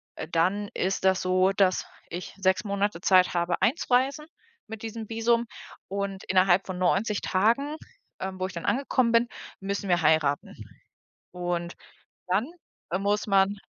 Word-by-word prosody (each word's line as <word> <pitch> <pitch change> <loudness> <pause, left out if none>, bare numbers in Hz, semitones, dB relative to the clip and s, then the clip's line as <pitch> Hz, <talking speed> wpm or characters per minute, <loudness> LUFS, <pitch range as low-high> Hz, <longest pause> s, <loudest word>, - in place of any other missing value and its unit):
äh, - - -6
dann 190 +5 +1
ist 190 +1 -1
das 190 -1 +3
so, 185 +1 +3
dass 190 -2 +2 0.2
ich 175 +2 -6
6 190 -1 +2
Monate 200 -2 -1
Zeit 185 -1 +4
habe, 175 0 0
einzureisen 270 +2 +1 0.4
mit 220 0 -8
diesem 225 -1 -6
Visum 230 +1 +1 0.4
und 195 0 -3
innerhalb 185 0 +3
von 185 -1 -4
90 195 +4 +1
Tagen, 235 +10 +1 0.4
ähm, 190 0 -4
wo 185 - -1
ich 190 - -10
dann 170 - -6
angekommen 255 -2 +1
bin, 230 +1 +4 0.3
müssen 200 +1 -3
wir 175 -1 +3
heiraten. 155 -3 +2 0.8
Und 175 -1 -3 0.5
dann, 190 +6 +1 0.5
äh, 185 - 0
muss 205 +1 0
man 195 0 +3
195 Hz, 150 wpm, -27 LUFS, 185-220 Hz, 0.8 s, Zeit